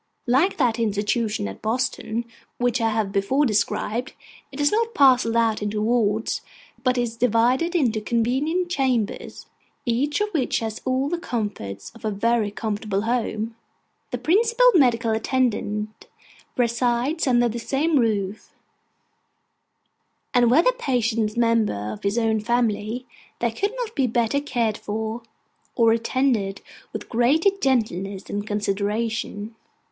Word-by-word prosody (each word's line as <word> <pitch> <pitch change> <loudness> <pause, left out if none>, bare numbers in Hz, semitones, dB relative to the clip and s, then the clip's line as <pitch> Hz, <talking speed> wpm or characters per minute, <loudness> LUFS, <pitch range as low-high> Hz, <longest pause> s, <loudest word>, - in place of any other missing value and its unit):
Like 275 +10 +2
that 240 -5 +1
institution 210 - 0
at 95 - -8
Boston, 235 0 -2 0.3
which 245 0 +1
I 225 - +2
have 215 -3 -1
before 210 +9 +2
described, 225 +1 -1 0.4
it 270 - -9
is 290 0 +3
not 455 +1 0
parcelled 255 -4 +5
out 225 -2 +2
into 210 0 -2
wards, 220 -1 +1 0.4
but 255 -1 +2
is 240 -2 -1
divided 250 - +2
into 235 -9 +2
convenient 265 +11 0
chambers, 255 - -1 0.4
each 265 +5 0
of 420 0 0
which 305 -10 0
has 220 -1 -4
all 260 +1 +1
the 345 +3 -2
comforts 205 - -4
of 230 +1 -17
a 215 - 0
very 220 +1 +1
comfortable 210 -1 -2
home. 225 -1 -1 0.5
The - - -3
principal 465 +8 +4
medical 240 -7 +3
attendant 220 -3 -1 0.5
resides 245 +5 +1
under 240 -1 +4
the 235 +1 -4
same 285 +5 +1
roof; 210 -3 -1 1.8
and 245 -2 +4
were 295 +8 +5
the - - +4
patients 230 - 0
members 220 - +1
of - - -10
his 200 +3 -1
own 225 -2 +2
family, 235 +1 -1 0.3
they 235 -1 0
could 405 - -2
not 470 -3 -4
be 270 -3 +2
better 235 +3 +1
cared 235 -7 -1
for, 220 +2 -4 0.5
or 230 -1 +4
attended 230 -4 0 0.3
with 215 -1 -6
greater 280 - +3
gentleness 200 -7 -1
and 205 +1 -3
consideration. 210 +1 -2
230 Hz, 135 wpm, -23 LUFS, 215-260 Hz, 1.8 s, parcelled